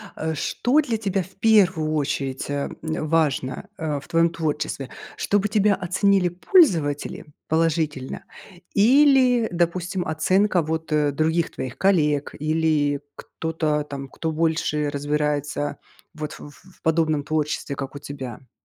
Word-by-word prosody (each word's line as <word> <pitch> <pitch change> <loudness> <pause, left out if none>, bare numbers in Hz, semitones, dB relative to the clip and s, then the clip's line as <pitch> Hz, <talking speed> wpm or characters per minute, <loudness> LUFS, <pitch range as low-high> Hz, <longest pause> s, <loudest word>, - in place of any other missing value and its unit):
Э, 160 0 -2
что 245 - +1
для 240 -6 -2
тебя 200 -3 -1
в 185 - -9
первую 185 -8 +3
очередь, 135 -3 -2
а, 145 0 -2
э, 160 -1 -3
важно, 155 +1 0
э, 155 -3 -2
в - - -15
твоём 165 0 +3
творчестве: 150 -4 -3 0.3
чтобы 205 0 +1
тебя 210 -1 +3
оценили 190 0 +2
пользователи 175 - +2 0.2
положительно 160 -4 -1 0.5
или, 255 +1 +5
допустим, 175 +1 -1
оценка 185 +4 +2
вот, 160 +1 -3
э, 150 -1 +2
других 160 +3 0
твоих 130 -1 -6
коллег 150 -7 +2
или 155 -2 +1 0.2
кто-то, 155 -2 -2
там, 140 -2 -7
кто 160 +3 -3
больше 155 -2 0
разбирается 145 0 -1 0.4
вот 155 -1 -5
в - - -10
в 165 +6 -20
подобном 160 -3 +1
творчестве, 150 -2 -2
как 135 -1 -5
у - - -6
тебя? 130 -3 -8
160 Hz, 130 wpm, -23 LUFS, 145-185 Hz, 0.5 s, или